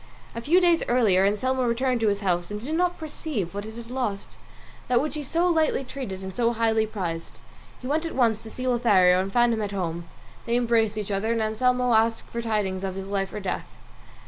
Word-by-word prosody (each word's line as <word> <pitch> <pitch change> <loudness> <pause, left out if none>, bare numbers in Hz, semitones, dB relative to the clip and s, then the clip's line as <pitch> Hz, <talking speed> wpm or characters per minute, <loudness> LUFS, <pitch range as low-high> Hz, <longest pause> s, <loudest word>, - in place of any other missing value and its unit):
A 230 - -5
few 330 +9 +4
days 345 -2 +3
later 205 -6 +4
Anselmo 255 +6 0
returned 245 +1 +1
to 225 - +1
his 200 0 +1
house 175 -3 0
and 210 0 -4
did 270 +8 -5
not 355 +1 +1
perceive 295 - -4
what 205 +1 -5
it 220 - -9
had 235 0 -9
lost, 230 -7 -3 0.5
that 245 -1 +3
which 305 - -2
he 305 - -4
so 335 +5 0
lightly 320 -5 +2
treated 250 -8 -6
and 190 -1 -7
so 235 -1 +2
highly 225 -1 +1
prized. 175 -6 -5 0.4
He - - -11
went 310 +5 0
at - - -7
once 230 -4 +2
to 225 - -9
see 255 +3 -5
Lothario, 195 -7 +4
and 195 +1 -4
found 240 +2 +3
him 220 - -1
at 205 -1 -3
home; 170 -3 -3 0.4
they 235 - +1
embraced 230 -3 +2
each 210 -1 -3
other, 200 +3 0
and 230 - -1
Anselmo 250 +3 +1
asked 225 +1 +2
for 235 - -3
the 230 - -5
tidings 195 -3 -1
of 190 -1 -3
his 195 0 -6
life 195 -1 -1
or - - -9
his 205 - -6
death. 185 - -4
225 Hz, 230 wpm, -25 LUFS, 200-255 Hz, 0.5 s, few